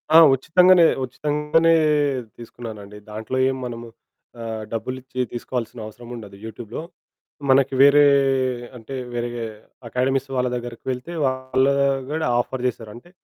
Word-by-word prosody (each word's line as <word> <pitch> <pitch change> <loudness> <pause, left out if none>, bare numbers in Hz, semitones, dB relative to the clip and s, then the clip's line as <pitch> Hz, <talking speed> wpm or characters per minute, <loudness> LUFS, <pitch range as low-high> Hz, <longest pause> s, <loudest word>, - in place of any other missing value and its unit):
ఆ! - - +11 0.2
ఉచితంగానే, 180 +5 +5 0.2
ఉచితంగానే 150 +5 +1 0.7
తీసుకున్నానండి. 110 -3 -9
దాంట్లో 110 +4 -4
ఏం 130 - -2
మనము 120 -1 -6 0.5
ఆహ్, 110 -1 -5
డబ్బులిచ్చి 130 +2 -5
తీసుకోవాల్సిన 120 -1 -4
అవసరముండదు 115 -2 -10
యూట్యూబ్‌లో. 110 +4 -7 0.7
మనకి 135 0 +4
వేరే 145 +1 +7 0.7
అంటే 115 +4 -10 0.2
వేరే 120 0 -2 0.6
అకాడమీస్ 135 +3 0
వాళ్ళ 125 0 +1
దగ్గరకెళ్తే 125 +5 -5
వాళ్ళు 130 +1 +1 0.4
కూడా 160 -2 -1
ఆఫర్ 125 +1 -3
చేశారు. 115 -3 -5
అంటే 120 +9 -14
125 Hz, 110 wpm, -22 LUFS, 115-135 Hz, 0.7 s, ఆ